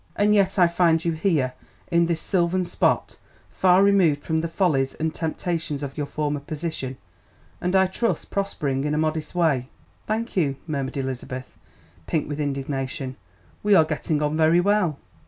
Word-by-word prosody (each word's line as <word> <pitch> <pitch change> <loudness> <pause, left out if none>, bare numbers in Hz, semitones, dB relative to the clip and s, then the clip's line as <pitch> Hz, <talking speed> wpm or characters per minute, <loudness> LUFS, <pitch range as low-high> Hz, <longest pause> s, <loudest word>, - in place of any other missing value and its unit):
"And 210 +1 +3
yet 200 -1 +3
I 180 -2 +6
find 170 -1 +2
you 170 - +2
here, 155 -6 0 0.4
in 170 0 +3
this 170 -1 0
sylvan 180 -1 +1
spot, - - 0 0.3
far 185 +1 +4
removed 180 -8 +3
from 160 -1 0
the 165 - -2
follies 155 -7 +1
and 160 0 -2
temptations 160 -2 -3
of 140 -1 -5
your 145 -1 -3
former 150 -1 -2
position, 145 -3 -5 0.6
and 180 +2 0
I 190 0 +6
trust 225 +5 -2
prospering 145 -9 -1
in 150 +1 0
a - - 0
modest 155 +1 -1
way." 140 -7 +1 0.4
"Thank 225 +2 -2
you," 145 -7 +1
murmured 140 -4 -3
Elizabeth, 130 -1 -5 0.5
pink 155 - 0
with 145 0 -4
indignation, 135 -2 -3 0.5
"we 205 -1 +4
are 160 - +6
getting 155 0 -1
on 150 +1 0
very 160 +2 +4
well." 185 -5 +2
160 Hz, 165 wpm, -24 LUFS, 145-180 Hz, 0.6 s, I